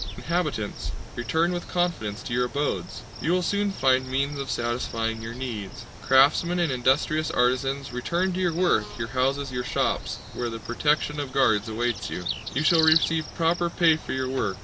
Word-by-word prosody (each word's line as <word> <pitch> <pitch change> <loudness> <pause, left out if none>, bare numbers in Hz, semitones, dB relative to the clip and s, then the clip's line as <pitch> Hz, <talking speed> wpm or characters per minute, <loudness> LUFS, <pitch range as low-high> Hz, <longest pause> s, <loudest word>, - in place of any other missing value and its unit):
Inhabitants, 155 - -2 0.3
return 160 +8 0
with 175 -1 -4
confidence 170 - -1
to 120 - -5
your 125 +1 +2
abodes! 145 +3 -3 0.2
You 165 - +1
will 180 0 +1
soon 205 +2 +1
find 130 -7 +2
means 140 +2 -1
of 135 - -4
satisfying 115 -1 -2
your 115 +1 -6
needs. 120 -6 -6 0.2
Craftsmen 145 +6 +4
and 170 -5 +1
industrious 135 +5 +1
artisans, 130 +2 0
return 170 +9 -1
to 185 - -3
your 180 -2 +2
work, 110 - +1
your 115 -1 -4
houses, 135 +2 0
your 125 -1 -2
shops, 120 - -1 0.2
where 120 -1 -3
the 115 - -5
protection 150 +5 0
of 140 -3 -4
guards 110 -5 +2
awaits 120 +1 -2
you! 90 - -5 0.3
You 145 - +1
shall 165 0 +5
receive 160 0 +4
proper 170 +1 +1
pay 170 -2 +4
for 155 - -6
your 130 0 -1
work. 105 -8 -2
135 Hz, 175 wpm, -25 LUFS, 120-165 Hz, 0.3 s, shall